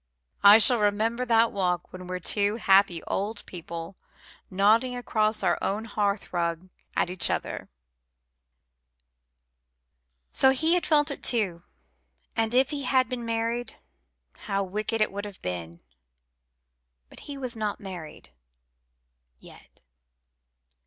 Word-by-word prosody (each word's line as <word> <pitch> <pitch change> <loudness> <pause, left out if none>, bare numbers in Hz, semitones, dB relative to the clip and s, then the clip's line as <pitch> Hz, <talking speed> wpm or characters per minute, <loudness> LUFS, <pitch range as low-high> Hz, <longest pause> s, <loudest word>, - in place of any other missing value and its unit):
I 205 +1 +9
shall 235 +2 +6
remember 220 +4 0
that 230 -1 +3
walk 180 -3 -2
when 185 -1 -9
we're 185 0 -3
two 205 +4 +1
happy 195 -5 +3
old 205 +3 -3
people 170 0 -8 0.5
nodding 220 +6 +2
across 215 -3 0
our 175 -2 +1
own 210 +3 -2
hearthrug 185 -5 -2 0.3
at 175 - 0
each 185 - +2
other." - - -3 2.6
So 265 - +4
he 320 +5 +1
had 355 - +1
felt 295 -2 +3
it - - -6
too; 195 -8 +1 0.7
and 225 +1 0
if 265 +3 +3
he 290 -1 -3
had 255 0 +2
been 245 -2 -4
married, 230 +1 -2 0.7
how 200 -1 0
wicked 215 +4 -3
it 215 - +2
would 200 +1 -5
have 205 -2 -10
been! 85 -2 -6 1.3
But - - -13
he 285 - -6
was 255 -3 -5
not 215 -2 -3
married 175 - -9 1.1
yet. - - -18
210 Hz, 125 wpm, -26 LUFS, 185-230 Hz, 2.6 s, I